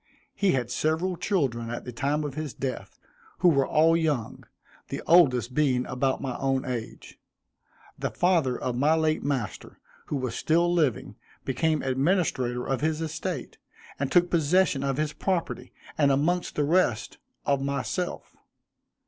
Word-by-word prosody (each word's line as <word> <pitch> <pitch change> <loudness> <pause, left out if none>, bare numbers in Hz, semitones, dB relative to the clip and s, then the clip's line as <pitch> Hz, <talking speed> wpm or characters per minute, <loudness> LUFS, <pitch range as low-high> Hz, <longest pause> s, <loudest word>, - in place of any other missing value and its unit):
He 200 -2 +2
had 125 -2 -1
several 160 +7 0
children 135 - -1
at 120 - -5
the 125 - -5
time 145 +5 -1
of 145 -2 -4
his 155 -2 -5
death, 130 -1 -5 0.4
who 180 - +5
were 140 -4 +2
all 160 +2 +4
young; 150 -8 -1 0.4
the - - -5
oldest 130 -8 +4
being 130 -4 +2
about 130 +2 -1
my 130 -2 -3
own 135 -1 0
age. 115 -3 -6 0.8
The - - -1
father 165 -9 +1
of 125 -1 -2
my 145 +6 +3
late 155 -1 +1
master, 135 -7 -4 0.3
who - - -2
was 130 -3 -2
still 170 +2 +2
living, 150 - 0 0.3
became 155 +4 0
administrator 130 -3 0
of 135 -1 -1
his 155 0 0
estate, 160 -2 -4 0.4
and 140 -1 -2
took 175 0 +4
possession 165 -2 +2
of 135 -1 -1
his 150 0 -1
property, 180 +1 -2 0.3
and 140 -2 +4
amongst 170 +6 0
the 150 - +1
rest, 150 -7 +1 0.3
of 140 -1 +1
myself. 140 +6 -3
145 Hz, 150 wpm, -27 LUFS, 130-165 Hz, 0.8 s, who